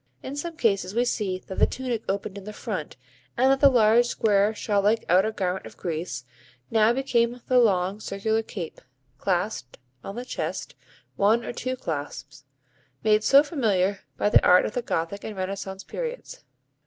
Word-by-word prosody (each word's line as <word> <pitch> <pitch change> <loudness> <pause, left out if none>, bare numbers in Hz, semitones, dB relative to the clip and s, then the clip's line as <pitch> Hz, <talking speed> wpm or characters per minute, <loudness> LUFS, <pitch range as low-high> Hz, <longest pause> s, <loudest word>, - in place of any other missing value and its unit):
In 270 - -5
some 330 +3 -5
cases 195 - +1
we 240 +1 +2
see 205 -6 -1
that 190 0 -8
the - - +5
tunic 245 -4 -3
opened 200 0 -2
in 200 - -8
the 210 - -7
front 185 - -5 0.4
and 260 +2 +4
that 270 - +2
the 280 - +7
large, 235 -1 +4
square, 210 -3 +2
shawl 205 -1 0
like 215 +3 +2
outer 190 +5 +4
garment 190 -3 -3
of - - -14
Greece 155 -7 -4 0.5
now 220 0 +4
became 240 -2 +1
the 255 -1 +4
long 195 -3 +2
circular 220 +2 -1
cape, 185 -6 -7 0.4
clasped 180 - -2 0.3
on 195 - -7
the 245 +1 -5
chest - - -4 0.4
(one 220 +4 +3
or - - -4
two 255 +2 -3
clasps), 145 - -6 0.6
made 215 0 +3
so 275 +4 +7
familiar 205 - 0 0.2
by - - +1
the - - +6
art 180 0 +6
of - - -4
the 245 - -1
Gothic 200 -2 -3
and 215 -2 -6
Renaissance 190 0 -4
periods. - - -6
210 Hz, 175 wpm, -25 LUFS, 190-240 Hz, 0.6 s, the